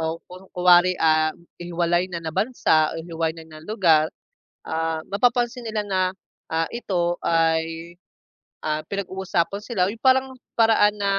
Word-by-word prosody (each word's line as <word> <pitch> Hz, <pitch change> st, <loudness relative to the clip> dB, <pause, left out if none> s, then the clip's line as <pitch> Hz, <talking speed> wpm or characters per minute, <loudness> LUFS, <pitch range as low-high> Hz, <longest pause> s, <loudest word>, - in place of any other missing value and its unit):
o 160 Hz, 0 st, -2 dB
kun 185 Hz, +1 st, -13 dB
kunwari, 180 Hz, 0 st, +4 dB
ah, 155 Hz, -1 st, +3 dB, 0.3 s
hihiwalay 175 Hz, +1 st, 0 dB
na 175 Hz, -2 st, -4 dB
na 160 Hz, -, -4 dB
bansa 160 Hz, -8 st, +2 dB
o -, -, -4 dB
hihiwalay 165 Hz, -1 st, -3 dB
na 155 Hz, -1 st, -12 dB
ng 160 Hz, -, -17 dB
lugar, 165 Hz, -7 st, +3 dB, 0.6 s
ah, 160 Hz, 0 st, -2 dB
mapapansin 240 Hz, +3 st, +1 dB
nila 220 Hz, -1 st, -2 dB
na, 195 Hz, -2 st, -1 dB, 0.5 s
ah, 165 Hz, 0 st, -1 dB
ito 175 Hz, -7 st, -1 dB
ay, 165 Hz, 0 st, 0 dB, 0.7 s
ah, 155 Hz, 0 st, 0 dB
pinag-uusapan 190 Hz, -2 st, -2 dB
sila, 195 Hz, -6 st, 0 dB
yung 225 Hz, -, -9 dB
parang 265 Hz, 0 st, +4 dB, 0.3 s
paraan 220 Hz, -2 st, +4 dB
na, 200 Hz, -1 st, +1 dB
175 Hz, 145 wpm, -23 LUFS, 165-205 Hz, 0.7 s, kunwari